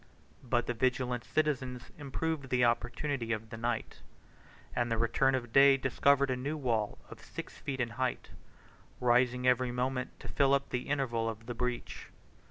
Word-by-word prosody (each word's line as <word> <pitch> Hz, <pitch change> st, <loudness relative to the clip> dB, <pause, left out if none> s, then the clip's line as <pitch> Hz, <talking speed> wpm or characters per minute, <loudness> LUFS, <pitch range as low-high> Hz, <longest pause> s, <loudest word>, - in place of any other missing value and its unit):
But 120 Hz, -1 st, +1 dB
the 120 Hz, -, -1 dB
vigilant 125 Hz, 0 st, 0 dB
citizens 130 Hz, -2 st, -1 dB
improved 145 Hz, 0 st, -3 dB
the 125 Hz, -1 st, +3 dB
opportunity 120 Hz, +1 st, -1 dB
of 110 Hz, 0 st, -3 dB
the -, -, -5 dB
night; 120 Hz, 0 st, -3 dB, 0.7 s
and 120 Hz, -1 st, 0 dB
the 115 Hz, -, +1 dB
return 115 Hz, +4 st, +2 dB
of 120 Hz, -3 st, -4 dB
day 135 Hz, 0 st, +7 dB
discovered 140 Hz, +1 st, +3 dB
a -, -, +1 dB
new 140 Hz, +5 st, -3 dB
wall 115 Hz, -7 st, 0 dB
of -, -, -10 dB
six -, -, -8 dB
feet 135 Hz, -1 st, -4 dB
in 120 Hz, -1 st, 0 dB
height, 125 Hz, +2 st, -2 dB, 0.7 s
rising 125 Hz, +1 st, +3 dB
every 125 Hz, 0 st, +3 dB
moment 125 Hz, +1 st, -2 dB
to -, -, -9 dB
fill 140 Hz, -1 st, +3 dB
up 140 Hz, -, -2 dB
the 125 Hz, +2 st, -3 dB
interval 120 Hz, -5 st, 0 dB
of 115 Hz, 0 st, -7 dB
the 120 Hz, -, -4 dB
breach. 125 Hz, +1 st, -4 dB
125 Hz, 170 wpm, -32 LUFS, 120-135 Hz, 0.7 s, day